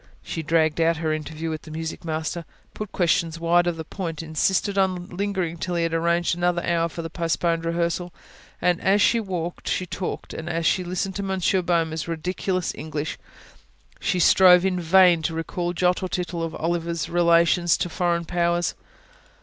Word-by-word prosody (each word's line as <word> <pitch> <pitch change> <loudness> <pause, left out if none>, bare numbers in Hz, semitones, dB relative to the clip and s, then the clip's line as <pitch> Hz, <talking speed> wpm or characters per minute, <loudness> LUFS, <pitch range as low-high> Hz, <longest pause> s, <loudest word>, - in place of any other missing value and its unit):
She 165 - -4
dragged 160 0 +1
out 165 0 +3
her 160 -1 -1
interview 155 +1 -4
with 155 - -4
the 160 - -13
music 160 +1 -5
master, 160 +1 -3 0.3
put 215 -2 -6
questions 170 -2 +1
wide 175 +1 +3
of 175 -2 -1
the 160 - -4
point, 165 -2 -5
insisted 190 +5 0
on 185 -2 0
lingering 185 -3 -2
till 180 +1 -2
he 170 - +1
had 165 0 -1
arranged 170 +1 +1
another 175 0 0
hour 170 -1 +1
for 165 +1 -6
the 165 - -5
postponed 165 -1 0
rehearsal; 170 +1 -1 0.5
and, 180 0 +1
as 195 +2 +3
she 230 +3 +4
walked, 175 -5 -4
as - - +2
she 185 - -3
talked, 180 +1 -5
as 165 0 -3
she 185 - +2
listened 185 +1 -3
to - - -2
Monsieur 190 -1 +1
Boehmer's 165 -2 0
ridiculous 180 +2 -2
English, 155 -1 -5 0.8
she - - 0
strove 180 +1 +6
in 185 -1 +1
vain 175 0 +5
to 160 +1 -2
recall 175 +2 -2
jot 180 +1 +1
or 185 - -3
tittle 175 -1 -3
of 165 -1 -3
Oliver's 170 0 -2
relations 170 0 +3
to - - -1
foreign 170 0 -1
powers. 175 0 0
170 Hz, 180 wpm, -24 LUFS, 165-180 Hz, 0.8 s, strove